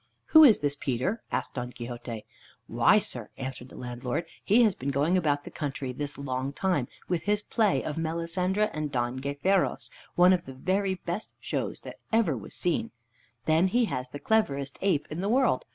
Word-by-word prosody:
"Who 315 0 +9
is 235 - +7
this 145 -1 0
Peter?" 145 - -1
asked - - -2
Don 125 -1 -4
Quixote. 120 -2 -7 0.4
"Why, - - +4
sir," - - -2
answered 130 -1 -6
the - - -12
landlord, 125 +5 -3 0.2
"he 230 +5 +5
has 215 -4 +4
been 140 -4 -4
going 145 +6 +2
about 145 -5 +1
the - - -9
country 140 -3 -4
this 145 +2 -3
long 135 0 -3
time 175 -8 0 0.2
with 175 -3 0
his 205 0 +1
play 215 -3 +1
of 155 +1 -3
Melisendra 170 +5 0
and 155 -2 -3
Don 120 -1 -1
Gayferos, 140 +8 0 0.2
one 180 +1 +7
of 175 -2 0
the 135 - -7
very 190 +7 0
best 180 +3 -5
shows - - -3
that - - -10
ever 220 -10 +3
was 110 - -8
seen. 205 +7 0 0.6
Then 160 +4 +4
he 240 +5 +2
has 125 -10 -4
the 145 - -7
cleverest 140 -6 0
ape 180 -7 +2
in 160 +4 -3
the 200 - -1
world. 265 - +2
155 Hz, 185 wpm, -28 LUFS, 135-190 Hz, 0.6 s, Who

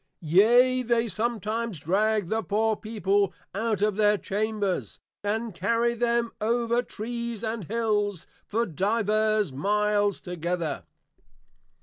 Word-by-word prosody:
Yea, 240 +10 +5
they 235 -1 +1
sometimes 220 0 -2
drag 200 +6 +1
the 220 +4 0
poor 220 +3 +1
people 205 -3 0 0.2
out 215 +1 -1
of 210 -1 +1
their 210 -1 +4
chambers, 205 -1 -2 0.2
and 220 +1 -2
carry 230 +7 +1
them 235 0 0
over 235 +2 +1
Trees 235 -1 -5
and 220 -3 -3
Hills, 210 -3 -1 0.2
for 230 +3 0
divers 215 - +1
miles 205 +5 +1
together. 170 -3 -3
215 Hz, 110 wpm, -26 LUFS, 200-230 Hz, 0.2 s, Yea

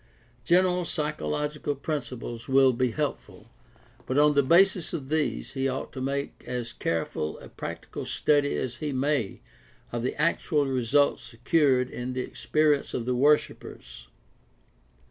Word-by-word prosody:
General 180 0 +3
psychological 150 -2 -2
principles 125 -4 -5
will 135 -1 +5
be 125 +1 +1
help 110 - -1
ful, - - -18 0.6
but 130 - -1
on 150 0 +5
the 140 - +4
basis 180 +5 +4
of 140 -5 -5
these 155 -1 -1
he 135 -1 -1
ought 130 +1 -4
to 130 - -6
make 140 +1 -3
as 125 -1 -4
careful 80 -2 -2
a - - -12
practical - - -7
study 145 -1 +2
as 120 -2 -3
he 150 +1 -3
may 135 -5 -1 0.5
of 120 - -2
the 125 +4 -3
actual 155 -1 +1
results 135 +2 +2
secured 125 +2 +1
in 125 +1 -4
the 130 - -2
experience 150 +2 0
of 120 - -2
the 125 - 0
worshipers. 130 - 0
140 Hz, 145 wpm, -27 LUFS, 125-150 Hz, 0.6 s, will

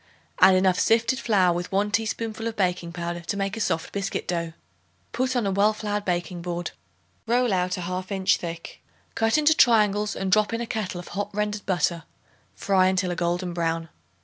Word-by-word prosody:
Add 185 0 +7
enough 185 -1 +3
sifted 230 +3 +2
flour 190 -6 +3
with 175 +1 -4
1 200 +2 +1
teaspoonful 225 +1 -2
of 225 - -4
baking 180 -4 -1
powder 175 0 -4
to 170 +4 -4
make 195 +1 -2
a - - -6
soft 160 -5 -1
biscuit 200 -1 -3
dough. 170 -2 -2 0.6
Put 255 +1 -1
on 240 -4 +1
a 195 - 0
well 205 +3 +3
floured 210 -1 -3
baking 175 -1 -2
board. 175 0 -4 0.6
Roll 240 -1 +2
out 180 0 0
a - - -4
half 185 +2 -4
inch 190 -1 +2
thick. 165 -1 -7 0.3
Cut 225 +2 +2
into 305 +1 +5
triangles 210 -4 +3
and 190 -1 -2
drop 215 +2 +3
in 230 - -1
a - - -2
kettle 215 -5 -3
of 175 - -9
hot 205 +1 -3
rendered 210 0 -2
butter; 175 -3 0 0.5
fry 190 -2 +2
until 185 -1 +1
a - - -2
golden 175 +1 -1
brown. 165 -1 -2
190 Hz, 195 wpm, -25 LUFS, 175-215 Hz, 0.6 s, Add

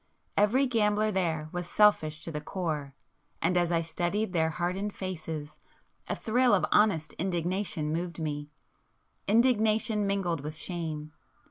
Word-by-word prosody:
Every 225 +7 +4
gambler 215 -3 +2
there 165 -5 -1
was 175 0 -4
selfish 155 -7 +3
to 165 - -5
the 150 -1 -4
core, 150 -5 -3 0.4
and 180 - +1
as 175 -1 +2
I 165 -1 +2
studied 175 +5 -1
their 160 -2 +2
hardened 185 +5 -2
faces, 155 -5 -5 0.5
a - - 0
thrill 245 +2 +3
of - - +2
honest 200 -7 +3
indignation 175 -3 -1
moved 170 +1 -3
me,—indignation 210 - -1
mingled 180 -6 0
with 150 +2 -6
shame. 160 -3 -4
175 Hz, 130 wpm, -29 LUFS, 160-210 Hz, 0.5 s, Every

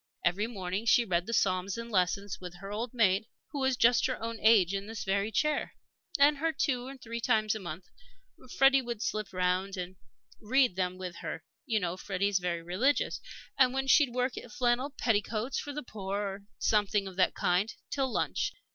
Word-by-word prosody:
Every 195 +5 +2
morning 195 -1 -4
she 235 +2 +5
read 175 -3 0
the - - -3
Psalms 185 -1 +1
and 230 0 -6
Lessons, 190 +1 0
with 180 -1 -8
her 195 +3 -9
old 225 +3 -3
maid, 215 -3 +2 0.2
who 285 - -4
was 265 -2 +1
just 240 +1 +4
her 255 - -3
own 230 0 -4
age 205 -5 +5
in 195 +1 -3
this 225 0 -5
very 200 +2 0
chair. 300 +6 0 0.4
And 285 0 +5 0.2
two 250 -3 0
or 270 0 -8
three 235 -2 -6
times 215 -3 +2
a 220 - -4
month 175 -1 -7 0.7
Freddie 270 0 +6
would 235 -3 -4
slip 215 -1 -2
round 185 +1 0
and 180 0 -6 0.4
read 250 -2 +3
them 185 -1 -1
with 180 -2 -6
her - - -6 0.2
you 225 -4 +2
know 180 -2 -2
Freddie's 195 0 0
very 170 -2 -2
religious. 210 +12 +1 0.4
And 255 -1 +5
then 270 0 0
she'd 275 0 +5
work 250 +1 -1
at 240 - -12
flannel 245 +4 +1
petticoats 225 0 -1
for 290 - -5
the 300 +1 -5
poor, 200 -4 -5
or 200 -1 -3 0.2
something 210 -1 +2
of 190 - -8
that 185 - +3
kind, 180 +5 +1 0.2
till 270 -2 0
lunch. - - -1
215 Hz, 190 wpm, -30 LUFS, 185-245 Hz, 0.7 s, Freddie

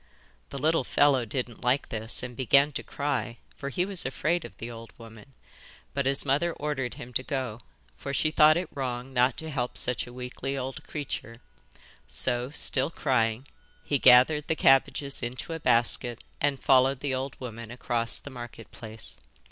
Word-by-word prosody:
The 140 - -6
little 155 +1 +2
fellow 135 -1 +3
didn't 120 +1 -4
like 125 +3 +1
this, 110 +2 -3
and 125 -1 -6
began 140 +4 +4
to - - -4
cry, 135 -5 -3 0.2
for 140 - -5
he 175 +6 0
was 195 -3 -1
afraid 160 +5 -1
of - - -11
the 115 +1 -6
old 115 0 -10
woman, 115 +3 -13 0.6
but 140 -1 0
his 135 +1 +3
mother 150 +5 +1
ordered 145 -5 -3
him 125 +1 -10
to 130 - +1
go, 130 -5 -3 0.4
for 105 - -5
she 155 +3 +1
thought 155 0 +6
it 175 0 -2
wrong 130 -1 -4
not 125 0 +3
to 160 0 -5
help 125 -3 -2
such 125 0 0
a - - -10
weakly 125 +2 -5
old 130 0 -5
creature; 120 -6 -6 0.7
so, 125 0 0
still 135 -1 +2
crying, 125 -5 0 0.4
he 145 - 0
gathered 130 +5 +6
the 160 - +1
cabbages 140 0 +3
into 125 +7 -5
a 165 - -4
basket 120 -2 +2 0.2
and 140 -2 0
followed 130 0 +4
the 140 -2 -1
old 130 0 -4
woman 115 -3 -7
across 120 -1 0
the 140 - -10
Market 120 -2 -9
Place. 110 -1 -9
130 Hz, 175 wpm, -28 LUFS, 120-140 Hz, 0.7 s, thought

